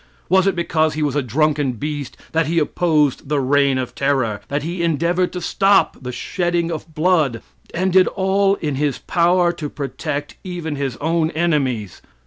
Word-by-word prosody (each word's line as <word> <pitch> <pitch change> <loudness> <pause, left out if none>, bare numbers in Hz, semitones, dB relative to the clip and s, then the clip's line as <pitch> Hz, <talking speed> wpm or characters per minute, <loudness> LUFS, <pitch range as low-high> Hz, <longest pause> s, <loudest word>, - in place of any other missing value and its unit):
Was 190 +2 +4
it 195 - +2
because 160 -2 +1
he 155 - -1
was 145 -2 -1
a 145 - +2
drunken 145 +1 +1
beast 145 +2 -5
that 160 -1 +1
he 170 +2 -1
opposed 150 -4 +1
the 150 -1 +1
"Reign 140 0 +2
of 130 -1 -3
Terror 130 -7 0
" - - -38
that 145 +1 -2
he 170 +2 -3
endeavored 170 +2 +1
to 180 - -4
stop 195 +3 +3
the 125 -1 -5
shedding 175 +5 -1
of 160 0 -7
blood, 155 -8 +2 0.3
and 185 +1 -1
did 185 -1 +6
all 195 +1 +2
in 150 -7 -3
his 145 -1 0
power 175 0 +2
to 150 -4 -5
protect 145 +1 -5
even 175 -5 -4
his 135 -3 -3
own 160 +1 0
enemies? 140 - -1
155 Hz, 180 wpm, -20 LUFS, 140-175 Hz, 0.3 s, did